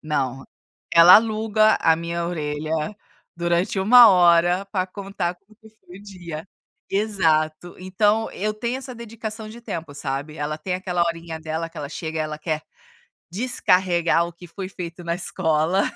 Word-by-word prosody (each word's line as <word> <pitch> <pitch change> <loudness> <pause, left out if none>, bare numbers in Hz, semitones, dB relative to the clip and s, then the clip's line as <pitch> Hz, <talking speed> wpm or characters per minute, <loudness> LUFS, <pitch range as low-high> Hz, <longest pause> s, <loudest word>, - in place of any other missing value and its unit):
Não, 135 -4 -2 0.5
ela 170 +2 +10
aluga 215 0 +2
a 160 - +4
minha 170 +1 -3
orelha, 155 -2 -4 0.6
durante 175 +3 0
1 235 +4 +8
hora, 175 0 +4
pra 185 -2 0
contar 190 -2 -4
como 195 +4 -25
que 220 - -16
foi 195 -4 -16
o - - -15
dia. 175 -5 -8 0.4
Exato, 175 -5 0
então 210 +4 +1
eu 210 +2 -3
tenho 235 +4 -3
essa 265 -1 -8
dedicação 220 -1 -7
de 230 +2 -11
tempo, 165 -10 -6
sabe? 145 +2 -5
Ela 150 +1 -3
tem 180 +4 -5
aquela 180 -1 -1
horinha 165 -1 -3
dela 160 +1 -4
que 165 - -21
ela 145 -2 -5
chega 160 +1 -5
e - - +1
ela 155 0 -5
quer 155 -1 -3 0.7
descarregar 180 -6 +1
o 175 - -9
que 175 +1 -13
foi 190 +1 -7
feito 175 -2 -8
na 170 - -1
escola. 170 0 0
175 Hz, 160 wpm, -22 LUFS, 160-205 Hz, 0.7 s, ela